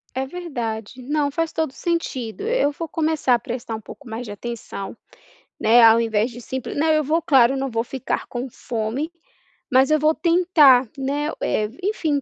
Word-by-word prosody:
É 265 +1 -1
verdade. 255 -8 -5
Não, 290 +2 0
faz 330 +2 -1
todo 320 -2 -1
o - - -24
sentido. 270 - -3
Eu 465 -12 +2
vou 330 +3 -6
começar 315 -6 +1
a - - -1
prestar 235 0 -5
um 220 - -7
pouco 260 +4 -12
mais 225 +2 -5
de 210 - -7
atenção, 220 -1 -7 0.6
né, 235 +2 +6
ao 225 0 +7
invés 225 +1 0
de 240 +1 -10
simple 260 +1 -5
não, 305 +3 +1
eu 310 0 +3
vou 315 +4 +1
claro, 270 -5 +4
não 270 0 -2
vou 230 -1 -1
ficar 260 +2 -3
com 250 +2 -5
fome, 240 +7 -3 0.6
mas 265 +3 +4
eu 310 - +4
vou 310 +2 +3
tentar, 315 -7 +5
né. 285 +3 -1
Eh, 210 -1 0
enfim, 320 -8 0
265 Hz, 185 wpm, -22 LUFS, 235-310 Hz, 0.6 s, ao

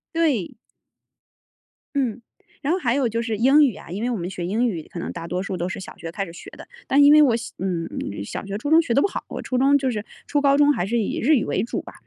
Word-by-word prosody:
对。 280 - +1 1.4
嗯， 250 -4 -1 0.4
然 285 - 0
后 375 - 0
还 245 -4 +1
有 275 -3 +2
就 230 +1 -2
是 225 -2 -2
英 270 +6 +5
语 255 -8 +2
啊， - - -12
因 190 +5 -5
为 245 - 0
我 235 - -1
们 175 +1 -4
学 175 -2 -5
英 230 +6 +1
语 170 -8 -4
可 175 - -6
能 - - -4
大 165 -1 -7
多 180 +2 -2
数 190 -1 -4
都 175 +1 -2
是 190 - -5
小 190 - -9
学 165 -1 -7
开 195 +2 -3
始 170 - -11
学 - - -11
的。 - - -12 0.2
但 285 +1 +5
因 290 - +8
为 305 - +8
我 255 -6 +4
小 235 - -6
嗯， 175 -3 -2 0.4
小 - - -6
学 200 0 -4
初 260 +7 -4
中 325 +1 +7
学 235 - -2
得 280 - +4
不 - - +3
好， - - -5
我 - - -5
初 255 - -2
中 275 +2 +5
就 265 -2 -1
是 210 -2 -3 0.2
初 290 - +1
高 280 0 +4
中 290 0 +5
还 175 - -1
是 235 +4 -1
以 210 - -2
日 300 +5 +4
语 235 - +1
为 190 - -1
主 235 - -3
吧。 - - -12
235 Hz, 305 characters per minute, -23 LUFS, 190-280 Hz, 1.4 s, 因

